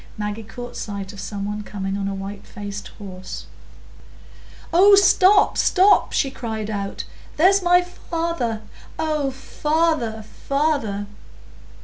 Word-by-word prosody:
Maggie 210 +1 -3
caught 245 +3 -9
sight 200 -1 -5
of 200 - -11
some 200 0 -4
one 210 +1 -3
coming 195 -1 -4
on 200 0 -2
a 195 - -3
white 195 +1 -7
faced 205 -2 -7
horse. 185 -2 -8 1.3
"Oh, 400 +4 +8
stop, 395 +1 +5
stop!" 390 +2 +4
she 270 - +1
cried 220 -4 -4
out. 200 -1 -4 0.3
"There's 385 +5 +5
my 355 0 +4
father! 330 -10 -3 0.3
Oh, 305 -3 0
father, 295 -4 -1
father!" 275 -5 -1
225 Hz, 120 wpm, -22 LUFS, 205-330 Hz, 1.3 s, Oh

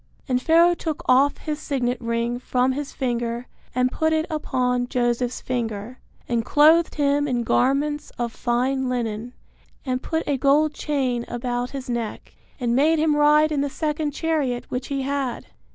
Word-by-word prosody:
And 250 -2 +1
Pharaoh 335 +4 +5
took 325 -1 -4
off 275 +3 +4
his 305 -1 -4
signet 250 -4 -2
ring 235 +1 -1
from 255 +1 +1
his 285 +2 -4
finger 240 -2 -2 0.3
and 255 0 +2
put 315 0 +1
it 315 0 +1
upon 250 -5 0
Joseph's 245 -1 -1
finger, 235 -1 -4 0.3
and 235 -1 0
clothed 315 +6 +4
him 290 0 +2
in 245 -3 0
garments 290 +5 +1
of 235 -1 -2
fine 255 +2 0
linen, 235 -1 -3 0.5
and 255 -1 -1
put 320 0 -2
a 280 -2 0
gold 295 +3 +3
chain 260 -7 -1
about 245 0 -3
his 270 -2 -7
neck, 235 -3 -4 0.3
and 240 -2 0
made 310 +5 +4
him 310 -1 +2
ride 300 +1 +4
in 290 -2 +1
the 285 - -1
second 300 +1 -2
chariot 290 -5 -1
which 250 +1 -3
he 275 -1 -2
had. 275 -2 -2
260 Hz, 165 wpm, -23 LUFS, 245-295 Hz, 0.5 s, Pharaoh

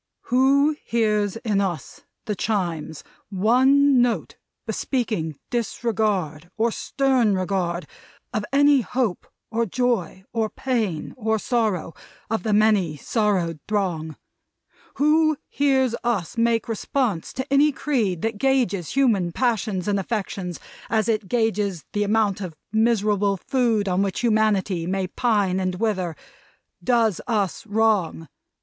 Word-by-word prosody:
"Who 280 +4 +4
hears 210 -3 +1
in 210 -3 0
us, 180 -5 -4 0.2
the 215 - -1
Chimes, 175 -8 -2 0.3
one 255 +7 +4
note 240 -1 0 0.3
bespeaking 215 - -2
disregard, 210 - -1
or 230 +1 +2
stern 255 -5 +1
regard, 185 -2 -1 0.5
of 215 - -1
any 285 0 +5
hope, 235 -3 -2 0.2
or 230 +1 0
joy, 215 -5 -1
or 225 -2 0
pain, 220 -9 -2
or 220 -2 0
sorrow, 215 -8 -1 0.4
of 225 - 0
the 220 - -2
many 205 -7 +3
sorrowed 185 - 0
throng; 175 -7 -1 0.8
who 310 +1 +3
hears 265 -4 +2
us 220 -8 -1
make 230 0 +1
response 225 -4 -1
to 260 - -3
any 295 +2 +5
creed 225 - -1
that 225 -2 -2
gauges 240 - +1
human 225 -10 +2
passions 215 -4 -1
and 200 -1 +1
affections, 195 -4 -4 0.3
as 220 -2 +1
it 215 -3 0
gauges 205 - 0
the 205 - 0
amount 205 -1 +1
of 180 -4 -6 0.2
miserable 210 -3 +2
food 230 -2 0
on 185 0 +1
which 195 -1 -1
humanity 210 -6 +1
may 190 +1 -1
pine 200 -2 +1
and 185 -1 -1
wither; 185 -5 -1 0.7
does 230 -6 +2
us 210 -3 -1
wrong. 205 -7 +1
215 Hz, 125 wpm, -23 LUFS, 185-240 Hz, 0.8 s, any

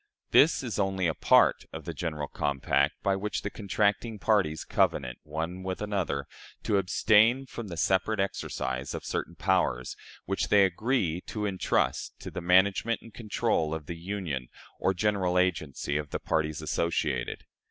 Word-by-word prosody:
This 155 -1 +5
is 120 -4 -3
only 95 -2 0
a 80 - +2
part - - +4
of - - -8
the - - -4
general 75 -4 -3
compact, 70 +1 0
by 100 -1 +2
which 105 +2 -3
the 100 - -3
contracting 105 +2 0
parties 100 -8 +1
covenant, 60 -1 0
one 80 +4 -4
with 95 0 -4
another, 95 -9 -2 0.4
to 105 - +2
abstain 110 +7 +4
from 120 -4 -7
the 85 -3 -7
separate 95 +6 +1
exercise 65 -8 -2
of - - -6
certain 85 - -3
powers, 85 -7 0 0.3
which 95 - -1
they 100 -1 +6
agree 95 -3 0
to 105 -1 -3
intrust 95 -2 0
to - - -7
the 90 - -5
management 95 +6 +3
and 115 - -13
control 80 -8 0
of 80 -2 -7
the 85 - -5
union 85 -7 -4 0.3
or 95 - +1
general 95 -2 +1
agency 80 -5 0
of 75 -1 -4
the - - -3
parties 80 -1 -1
associated. 80 -7 -1
95 Hz, 160 wpm, -28 LUFS, 80-105 Hz, 0.4 s, they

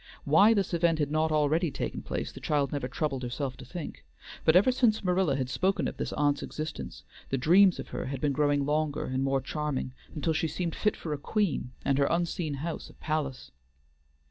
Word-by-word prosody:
Why 200 +10 +6
this 195 -3 0
event 170 -1 +3
had 145 -2 -1
not 155 +1 +1
already 155 +3 +2
taken - - -4
place - - -4
the - - -10
child 145 -3 0
never 140 -3 -2
troubled 135 0 -2
herself 130 +1 -3
to 130 - -10
think, 155 +6 -7 0.4
but 160 - +4
ever 200 +8 +6
since 235 -4 +2
Marilla 180 -5 +2
had 130 -2 -1
spoken 190 +9 0
of - - -6
this - - -3
aunt's 145 -1 +1
existence, 155 - -6 0.3
the 135 - 0
dreams 180 +8 +5
of - - -7
her - - -4
had 135 0 -4
been 145 0 +1
growing 145 0 +2
longer 150 0 0
and 130 +1 -1
more 135 0 +1
charming, 145 -2 -3 0.2
until 160 +1 0
she 160 +1 0
seemed 170 +1 -3
fit 210 - 0
for 155 - -4
a 145 - -4
queen, 200 - 0 0.2
and 140 0 +2
her 140 - +4
unseen 170 -2 -1
house 170 - -5
a - - -16
palace. 140 - -3
150 Hz, 205 wpm, -29 LUFS, 140-170 Hz, 0.4 s, Why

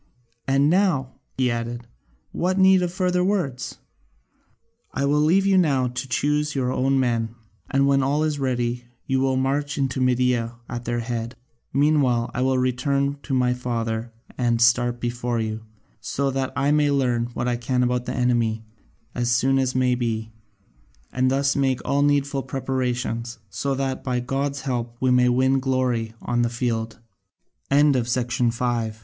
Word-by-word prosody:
And 135 +1 +3
now," 165 -7 +2 0.2
he 130 -2 +2
added, 120 +1 -4 0.5
"what 185 +2 -1
need 190 -1 +6
of 175 -1 -1
further 180 -1 +1
words? 180 -10 -1 1.1
I 140 - -1
will 145 +1 +2
leave 175 +6 +3
you 195 -1 +4
now 135 -7 +2
to 125 +2 -5
choose 150 +3 0
your 130 -2 0
own 135 +1 +1
men, 115 -3 0 0.3
and 135 0 +2
when 140 0 +3
all 145 +3 +1
is 150 -2 -1
ready 120 -2 -1 0.2
you 135 -1 0
will 135 0 +1
march 140 +2 -1
into 135 -1 -1
Media 125 -2 +1
at 120 0 -6
their 120 0 -1
head. 115 0 -4 0.4
Meanwhile 135 -5 +2
I 125 - -2
will 130 0 +2
return 140 +3 0
to 135 - -2
my 125 -1 +2
father 115 -2 -3 0.3
and 120 -2 +1
start 120 +1 +3
before 120 0 -2
you, 110 0 -3 0.4
so 135 +7 -1
that 135 0 -2
I 140 +1 +1
may 150 -1 +3
learn 125 -4 +1
what 120 - -2
I 120 - +1
can 125 +1 0
about 125 0 0
the - - -3
enemy 115 -3 0 0.5
as 120 -1 -1
soon 130 +3 +3
as 130 -1 0
may 130 -1 +2
be, 110 -2 -2 0.8
and 130 +1 +2
thus 140 +1 +1
make 135 -2 +1
all 140 0 +1
needful 140 -1 +1
preparations, 125 -3 -3
so 135 +7 -2
that 135 -1 -2
by 125 -2 -1
God's 135 +3 -2
help 120 -3 -3
we 130 -1 +2
may 125 0 +4
win 130 +2 +2
130 Hz, 150 wpm, -23 LUFS, 120-140 Hz, 1.1 s, need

